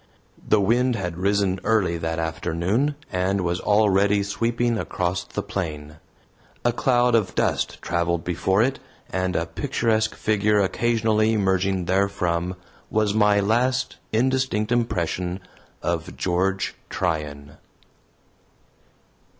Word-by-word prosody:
The 110 - +3
wind 120 +5 +2
had 90 -5 -3
risen 100 -1 +1
early 105 -6 +2
that 80 0 -2
afternoon, 85 - -1 0.2
and 95 +2 0
was 90 0 -1
already 100 -1 +3
sweeping 115 +3 0
across 90 0 -2
the 90 - -5
plain. 75 -5 -5 0.7
A 120 - +4
cloud 120 0 +2
of 105 -5 +1
dust 95 - 0
traveled 85 0 0
before 95 +4 +1
it, 130 +2 -1 0.3
and 95 -1 -1
a 85 - +1
picturesque 110 - 0
figure 105 0 +2
occasionally 110 +1 +2
emerging 95 -2 +1
therefrom 90 -2 0 0.3
was 105 -1 +1
my 105 -1 +4
last 125 +5 +1
indistinct 125 -2 +1
impression 90 -6 -1 0.4
of - - -2
George 95 +2 0 0.2
Tryan. 75 -5 -3
100 Hz, 110 wpm, -23 LUFS, 90-110 Hz, 0.7 s, A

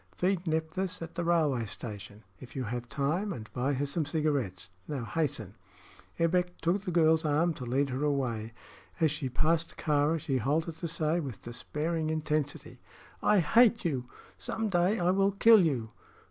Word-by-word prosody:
Feed 185 -1 0
Nephthys 160 +4 -1
at 165 - -8
the 170 - -2
railway 155 -8 +2
station, 105 -1 -8 0.2
if 130 - -12
you 130 - -2
have 120 +1 -4
time, 155 - -1
and 110 - -8
buy 130 +3 0
her 140 +2 0
some 150 +3 -1
cigarettes. 140 - -1 0.2
Now 135 -6 -3
hasten." 140 - -2 0.6
Ebbek 180 +2 +1
took 175 +4 +1
the 195 - -5
girl's 160 -1 +4
arm 155 +3 +2
to 130 - -7
lead 135 +3 +1
her 130 +3 -2
away. 125 -7 -1 0.5
As 160 -3 +3
she 150 -3 -3
passed 160 +6 0
Kāra 150 +1 +2
she 135 -2 -1
halted 155 +6 -1
to 170 - -4
say, 160 +1 0
with 135 - -6
despairing 155 +7 -3
intensity: 155 -2 -2 0.4
"I 205 -3 +4
hate 230 +5 +4
you! 135 -7 -1 0.3
Some 225 -1 -2
day 185 +3 +2
I 175 +1 +3
will 195 +1 +2
kill 220 0 +7
you." 125 -9 -1
155 Hz, 170 wpm, -30 LUFS, 130-170 Hz, 0.6 s, kill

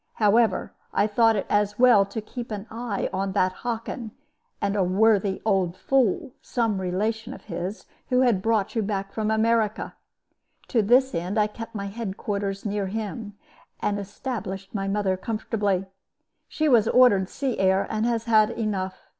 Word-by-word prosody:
However, 220 +2 +2 0.2
I - - +4
thought 225 +1 +3
it 200 - -1
as 205 0 +1
well 240 -5 +6
to 220 - -5
keep 240 +3 -7
an 210 -2 -5
eye 230 -2 -3
upon 190 0 -2
that 185 -2 +2
Hockin, 230 +2 -5 0.5
and 200 0 -1
a 200 - +2
worthy 195 +1 +2
old 190 -4 +1
fool, 270 - +1
some 225 -5 -1
relation 210 +5 -2
of - - -14
his, 190 +4 -5 0.2
who 250 0 +3
had 235 -7 +3
brought 220 -2 +1
you 225 - +2
back 195 -1 -3
from 215 -1 -1
America. 220 -1 +1 0.8
To 235 - +3
this 250 +5 +4
end 180 +5 -2
I 210 - +4
kept 225 +2 -8
my 200 -1 -3
head 200 -1 -5
quarters 200 -1 -3
near 205 -1 -1
him, 210 +1 -5 0.4
and 205 0 -1
established 200 -2 -5
my 195 -2 -2
mother 195 -1 +1
comfortably. 205 -2 -1 0.6
She 310 - -1
was 235 -6 +5
ordered 205 -8 +5
sea 270 -3 -3
air, 190 0 +3
and 220 0 -2
has 230 -2 0
had 220 -2 +4
enough. 200 -5 -3
210 Hz, 165 wpm, -25 LUFS, 195-230 Hz, 0.8 s, well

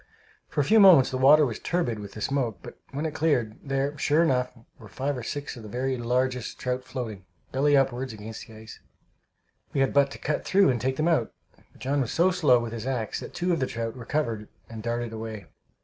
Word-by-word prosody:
For - - 0
a - - +2
few 220 +10 +5
moments 180 -10 +7
the 130 - -2
water 145 +3 +7
was 120 -5 -4
turbid 145 -11 -1
with 100 -1 -9
the 105 - -8
smoke, 125 -5 -1
but - - -11
when 145 +3 -4
it 155 - -2
cleared, 125 -9 0
there, 135 +1 -1
sure 155 +5 +3
enough, 125 -5 +1 0.3
were 110 - -12
five 135 +7 -3
or 125 - -5
six 145 +5 -5
of 120 - -10
the 110 - -9
very 130 +3 -1
largest 125 0 -1
trout 125 0 -2
floating, 115 -7 -6 0.3
belly 140 +2 +3
upward, 130 -1 0
against 110 +1 -9
the 110 - -13
ice. 110 0 -11 0.9
We 135 - +1
had 135 - +1
but 140 -1 +4
to - - -9
cut 150 - -2
through 195 -6 +4
and 120 - -2
take 130 +1 0
them 155 +4 0
out, 155 -10 +2 0.2
but - - -25
John 140 +2 0
was 120 - -2
so 180 +3 +3
slow 150 -9 +4
with 120 -1 -5
his 115 +1 -5
axe 120 -5 -2
that - - -9
two 175 0 0
of 165 - 0
the 130 - 0
trout 115 -1 -4
recovered 115 -4 -2 0.2
and 110 -1 -8
darted 120 0 -3
away. 110 -3 -6
130 Hz, 225 wpm, -26 LUFS, 115-145 Hz, 0.9 s, moments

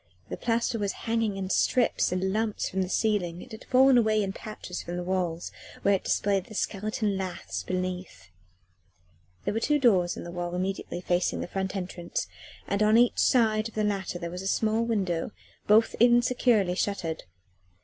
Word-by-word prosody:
The - - -3
plaster 230 -1 0
was 200 -1 -1
hanging 225 -3 0
in 190 0 -3
strips 245 -7 +2
and 190 +1 0
lumps 220 0 -1
from 190 - -2
the 185 - -2
ceiling; 185 -6 0
it - - -15
had 220 - -10
fallen 260 0 +5
away 215 -2 +2
in 195 -1 -3
patches 210 -4 -7
from 175 +1 -5
the 180 - -3
walls 175 -2 -2 0.3
where 200 - +4
it 195 - 0
displayed 195 -2 +1
the 215 - -11
skeleton 210 0 -1
laths 185 -2 -4
beneath. 180 - -5 1.1
There - - 0
were 225 - 0
two 295 +5 +2
doors 195 -10 +3
in - - -6
the 170 - -7
wall 175 0 -4
immediately 185 -1 -3
facing 180 0 0
the - - -4
front 190 +1 -3
entrance, 180 -2 -4 0.4
and 200 +1 -1
on 215 +1 +5
each 240 0 +3
side 220 -3 +3
of - - -20
the 215 - 0
latter 195 -3 -1
there 170 -1 -5
was 180 +1 -5
a 190 - -4
small 220 +3 +1
window, 195 -6 -1 0.3
both 220 +2 +5
insecurely 240 -4 +4
shuttered. 180 -4 -2
195 Hz, 180 wpm, -27 LUFS, 180-220 Hz, 1.1 s, fallen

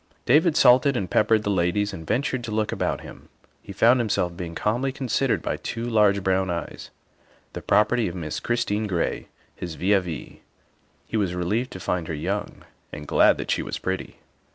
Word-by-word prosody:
David 155 +5 +4
salted 125 +2 +5
and 95 - -2
peppered 110 0 +3
the 105 - 0
ladies 100 +3 0
and 80 -4 -8
ventured 130 -2 -1
to 110 - -6
look 110 0 0
about - - -2
him. - - -13 0.3
He - - -10
found 120 +6 +4
himself 100 -6 0
being 85 -2 -6
calmly 120 +8 0
con 130 -1 -6
sidered 135 +2 +1
by - - -2
two 115 +1 -5
large 105 -4 +3
brown 95 0 +1
eyes, 85 -1 -5 0.6
the - - -6
property 110 +2 +2
of 85 - -5
Miss 75 -3 -4
Christine 110 -3 -1
Gray, 90 -4 -2 0.3
his 85 -3 -6
vis 100 +5 +2
a - - +4
vis. 85 -4 -7 0.7
He 115 - -3
was 95 -4 0
relieved 105 +9 -1
to 95 - -7
find 90 -2 -2
her 80 - -3
young 75 - -4 0.3
and 75 0 -8
glad - - +4
that - - -3
she - - +1
was - - -4
pretty. - - -4
105 Hz, 195 wpm, -24 LUFS, 90-120 Hz, 0.7 s, salted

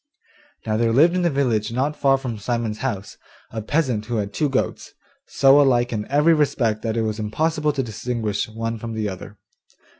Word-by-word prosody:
Now 110 -1 0
there 115 0 +2
lived 155 +9 +5
in 185 - +1
the 175 - +2
village 120 -7 0
not 135 +5 -1
far 135 -2 +3
from 125 -5 -5
Simon's 115 -1 -2
house, 105 -7 -4 0.3
a 110 - -4
peasant 120 -3 -1
who 120 - -2
had 105 -2 -2
two 150 - 0
goats, 135 - -2 0.3
so 140 +1 +5
alike 120 -3 +2
in 105 -1 -4
every 150 +4 +4
respect 120 -8 +1
that 115 0 -2
it 115 - +1
was 110 0 -2
impossible 150 +8 0
to 140 -2 -2
distinguish 110 -2 -3
one 115 +1 -4
from 115 +1 -6
the 110 -1 -2
other. 100 +2 -8
120 Hz, 190 wpm, -22 LUFS, 110-140 Hz, 0.3 s, lived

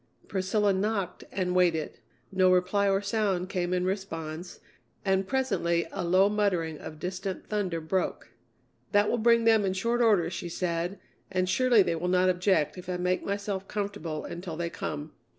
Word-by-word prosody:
Priscilla 200 +1 +1
knocked 195 -2 -2
and 180 -2 -1
waited. 165 -7 +1 0.3
No 185 -1 +4
reply 185 +3 +3
or 195 +1 +1
sound 200 -3 0
came 180 -2 -1
in 180 0 +1
response, 175 -3 -4 0.5
and 190 0 +2
presently 195 -10 +1
a - - -3
low 185 +3 +4
muttering 180 -7 0
of 155 - -8
distant 185 +3 -4
thunder 195 -6 -1
broke. 170 +4 -2 0.6
"That 205 0 +4
will 240 - +1
bring 230 +1 +4
them 225 -2 +5
in 190 -1 0
short 235 +5 0
order," 200 -8 +3
she 175 - -5
said, 175 +2 -2 0.3
"and 185 -1 +1
surely 245 0 +4
they 170 - 0
will 175 +2 -2
not 185 0 +3
object 180 -2 +1
if 180 0 -10
I 180 - -1
make 180 +1 0
myself 200 -1 -3
comfortable 200 -7 -4
until 170 -2 -6
they 170 0 -2
come." 150 +1 -5
185 Hz, 170 wpm, -28 LUFS, 175-200 Hz, 0.6 s, them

